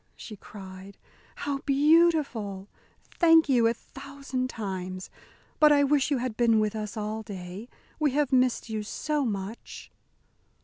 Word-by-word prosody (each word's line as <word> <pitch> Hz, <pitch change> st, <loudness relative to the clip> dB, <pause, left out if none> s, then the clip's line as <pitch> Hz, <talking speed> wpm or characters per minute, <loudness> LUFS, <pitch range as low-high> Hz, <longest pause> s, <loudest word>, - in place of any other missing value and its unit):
she 215 Hz, -, -9 dB
cried, 190 Hz, -1 st, -11 dB, 0.4 s
"how 285 Hz, -1 st, -3 dB
beautiful! 280 Hz, -, +2 dB, 0.5 s
Thank 325 Hz, -2 st, +6 dB
you 245 Hz, -4 st, +4 dB
a 230 Hz, -, +2 dB
thousand 275 Hz, -1 st, -6 dB
times. 185 Hz, -4 st, -5 dB, 0.5 s
But 305 Hz, -1 st, +7 dB
I 285 Hz, -1 st, +5 dB
wish 280 Hz, 0 st, +2 dB
you 285 Hz, -, +1 dB
had 245 Hz, -2 st, -3 dB
been 230 Hz, -2 st, +3 dB
with 215 Hz, 0 st, 0 dB
us 215 Hz, +1 st, -5 dB
all 215 Hz, +1 st, -3 dB
day. 195 Hz, +1 st, -8 dB, 0.3 s
We 305 Hz, -1 st, +3 dB
have 290 Hz, -2 st, +1 dB
missed 255 Hz, -2 st, +2 dB
you 220 Hz, -1 st, -3 dB
so 295 Hz, +7 st, -2 dB
much!" 205 Hz, 0 st, -6 dB
235 Hz, 140 wpm, -27 LUFS, 210-280 Hz, 0.5 s, But